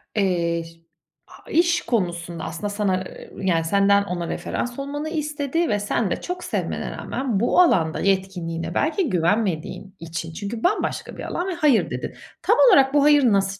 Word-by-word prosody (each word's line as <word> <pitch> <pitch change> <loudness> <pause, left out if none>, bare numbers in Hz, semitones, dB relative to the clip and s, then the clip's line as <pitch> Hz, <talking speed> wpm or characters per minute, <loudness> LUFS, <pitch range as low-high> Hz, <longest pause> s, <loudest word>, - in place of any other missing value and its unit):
Eee, 170 -4 +1
şi 165 0 -16 0.4
a - - -16
iş 340 +1 +3
konusunda 175 -6 -2
aslında 170 +6 -4
sana, 200 -3 0
eee, - - -11
yani, 170 -4 +1
senden 200 +3 +4
ona 180 -3 -4
referans 245 +8 -4
olmanı 290 +2 -4
istedi 305 +1 -1
ve 205 -2 +1
sen 205 0 -1
de - - -2
çok 360 0 -5
sevmene - - -3
rağmen 255 -7 -2
bu 240 - +2
alanda 165 - +3
yetkinliğine 175 -4 -1
belki 320 - +1
güvenmediğin 190 0 -1
için, 165 0 -6
çünkü 205 +6 -5
bambaşka 405 +4 -1
bir - - -6
alan, 355 - -3
ve 380 - -2
hayır 300 -9 +3
dedin. - - -5 0.3
Tam - - +3
olarak 270 - +5
bu 290 -1 +4
hayır 295 -1 +6
nasıl 195 0 +1
200 Hz, 170 wpm, -23 LUFS, 175-285 Hz, 0.4 s, hayır